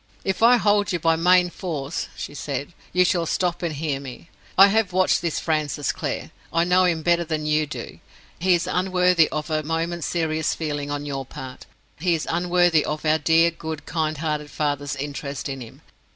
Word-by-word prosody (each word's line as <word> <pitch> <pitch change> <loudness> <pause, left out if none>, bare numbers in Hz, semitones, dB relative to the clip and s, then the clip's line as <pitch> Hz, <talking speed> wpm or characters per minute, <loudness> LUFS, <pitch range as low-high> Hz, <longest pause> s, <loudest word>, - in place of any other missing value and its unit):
"If 190 +1 -1
I 240 +2 +7
hold 205 -2 +2
you 175 - +1
by 165 0 +2
main 180 +1 +4
force," 160 -5 -4
she - - -6
said, 145 +2 -4 0.2
"you 180 +1 +4
shall 170 -2 +1
stop 175 0 -1
and 170 -2 -1
hear 145 -2 -2
me. 135 +3 -10 0.3
I 195 - +10
have 210 -3 +1
watched 185 -1 +3
this 170 -2 -1
Francis 150 -3 -1
Clare; - - -4 0.2
I 165 0 +2
know 180 +1 +4
him 165 -3 0
better 170 0 +3
than 155 -2 -3
you 150 0 +1
do. - - -7 0.4
He 180 +1 +4
is 175 0 -1
unworthy 180 -2 +3
of 155 +1 -4
a 155 0 +1
moment's 165 +2 -2
serious 160 -2 0
feeling 145 -3 -3
on 145 0 -3
your 135 -2 -3
part; 130 -1 -10 0.3
he 175 +1 +2
is 160 - -4
unworthy 175 -2 +3
of 150 +1 -4
our 155 +1 +3
dear, 165 +2 +4
good, 160 -1 -7
kind 155 -2 -1
hearted 150 -1 -2
father's 145 -2 -2
interest 140 -1 -5
in 135 -1 -5
him. 115 - -11
160 Hz, 195 wpm, -23 LUFS, 150-175 Hz, 0.4 s, I